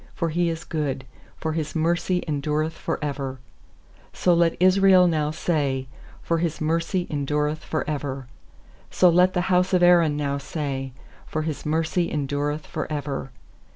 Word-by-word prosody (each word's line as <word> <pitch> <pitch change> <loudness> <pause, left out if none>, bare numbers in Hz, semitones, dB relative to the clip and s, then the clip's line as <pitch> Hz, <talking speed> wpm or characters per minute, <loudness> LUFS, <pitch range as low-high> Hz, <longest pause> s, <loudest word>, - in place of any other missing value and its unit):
1X0 - - -25
for 165 -2 -1
He 170 +2 +1
is 165 0 -4
good, 145 -5 -3 0.3
For 160 - -2
His 155 -1 -3
mercy 170 +3 +1
endureth 150 +2 -1
for - - -3
ever/ 135 -2 -4 0.8
2So 175 -1 +3
let 170 -1 +2
Israel 185 0 +6
now 155 -3 +1
say, 145 -5 -1 0.4
For 165 -1 0
His 165 -2 -1
mercy 165 +3 0
endureth 150 +1 -1
for 155 - -3
ever. 140 -3 -3 0.7
8So 180 -2 +5
let 180 +2 +4
the 180 0 +1
bouse 180 +1 +3
of 180 -1 +4
Aaron 170 -4 +5
now 140 -1 -1
say, 140 -2 -4 0.4
For 155 - -2
His 155 -1 -4
mercy 165 +2 0
endureth 145 +1 -2
for 155 0 -5
ever. 140 -2 -3
155 Hz, 155 wpm, -24 LUFS, 145-170 Hz, 0.8 s, Israel